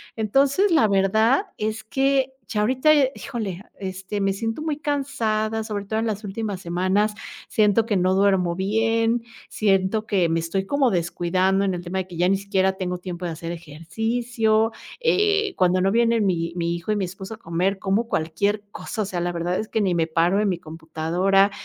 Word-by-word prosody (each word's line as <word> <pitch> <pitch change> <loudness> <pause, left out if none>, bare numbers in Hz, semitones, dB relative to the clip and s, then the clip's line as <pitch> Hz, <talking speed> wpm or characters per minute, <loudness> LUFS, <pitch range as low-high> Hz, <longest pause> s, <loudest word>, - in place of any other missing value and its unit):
Entonces, 275 - +2
la 270 -10 +5
verdad 220 - +3
es 215 +1 -3
que 270 +3 +1 0.2
ya 210 - 0
ahorita, 260 +7 +4
eh, 275 -3 +3
híjole, 200 -6 -5 0.2
este, 190 +1 -4
me 195 0 +2
siento 225 +7 -3
muy 305 -2 -2
cansada, 225 -7 -1
sobre 205 -2 -3
todo 220 +2 -1
en 225 - -1
las 215 0 -3
últimas 200 -1 -4
semanas 185 +5 +1 0.4
siento 215 +1 +3
que 215 -4 +1
no 185 +1 +2
duermo 190 -3 +2
bien. 225 +4 +1 0.3
Siento 200 +1 +1
que 180 -5 +2
me 165 - +1
estoy 190 +4 -2
como 280 +2 +2
descuidando 185 +2 +1
en 190 - 0
el 175 - -4
tema 180 +2 -4
de 185 - -4
que 180 - -10
ya 180 +1 +3
ni 195 - +3
siquiera 190 -1 +1
tengo 180 -1 -3
tiempo 180 -1 -6
de 170 - -2
hacer 165 +1 -6
ejercicio, 220 +8 -1 0.3
eh, 420 -3 +2
cuando 185 0 +2
no 195 - +2
vienen 230 -1 +3
mi 170 -3 0
mi 170 -1 -1
hijo 170 +5 -4
y 210 - +2
mi 200 - -1
esposo 190 +3 -8
a - - -21
comer 185 +1 -1
como 200 +5 0
cualquier 200 +7 0
cosa. 215 - -5
O - - -4
sea, 185 -2 -3
la 175 0 -1
verdad 175 +2 -1
es 215 - -4
que 220 - 0
ni 190 -3 +1
me 165 -1 +1
paro 170 +4 +2
de 210 - +1
mi 185 -3 0
computadora, 165 +5 +1
200 Hz, 195 wpm, -23 LUFS, 180-225 Hz, 0.4 s, la